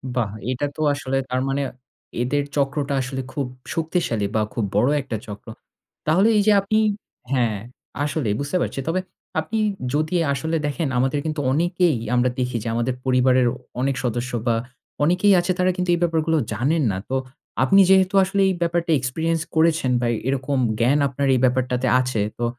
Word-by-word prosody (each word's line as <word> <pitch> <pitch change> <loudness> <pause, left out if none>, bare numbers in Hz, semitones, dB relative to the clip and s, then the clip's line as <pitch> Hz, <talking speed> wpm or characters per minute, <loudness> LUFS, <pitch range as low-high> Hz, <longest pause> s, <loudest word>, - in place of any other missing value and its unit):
বাহ! 115 -5 0 0.2
এটা 130 +3 -1
তো - - -5
আসলে 135 -1 -2
তার 125 0 0
মানে 135 +1 0 0.6
এদের 145 +4 0
চক্রটা 140 0 0
আসলে 130 +1 -4
খুব 140 - -2 0.3
শক্তিশালী 160 - -1
বা, 110 - +3
খুব 110 0 -1
বড় 120 +6 +4
একটা 130 -5 -4
চক্র। 105 +1 -9 0.6
তাহলে 180 +7 +4
এইযে 210 +1 +4
আপনি 205 +2 0 0.5
হ্যাঁ, 120 -5 +1 0.5
আসলে 150 -3 -1
বুঝতে 140 +6 -1
পারছি। - - -2
তবে 170 +3 +1 0.4
আপনি 160 +8 -3 0.4
যদি 155 +4 0 0.2
আসলে 160 +4 -2
দেখেন 150 +2 -2
আমাদের 135 +3 +1
কিন্তু 155 -1 -2
অনেকেই 175 0 +2 0.2
আমরা 125 +1 +3
দেখি 125 -1 -1
যে, - - -5
আমাদের 120 +2 0
পরিবারের 130 -1 +3
অ - - -5 0.3
অনেক 135 +1 +1
সদস্য 120 +1 -2 0.2
বা, 115 - +3 0.5
অনেকেই 180 +6 +4
আছে 175 +2 0
তারা 185 0 +3
কিন্তু 180 0 -2
এই - - -4
ব্যাপারগুলো 160 -1 +1 0.2
জানেন 150 +6 +1
না। 95 - -3
তো 130 - -1 0.5
আপনি 195 +10 +6
যেহেতু 190 0 +4
আসলে 195 +1 0
এই - - +1
ব্যাপারটা 170 0 0
experience 160 +5 -1
করেছেন 160 -4 +3
বা, 120 - +1 0.2
এরকম 135 +1 -1 0.2
জ্ঞান 130 +5 +3
আপনার 140 +1 -2
এই - - +2
ব্যাপারটাতে 125 0 +1
আছে। 125 -4 -1 0.2
তো 120 - -1
140 Hz, 170 wpm, -22 LUFS, 125-165 Hz, 0.6 s, আপনি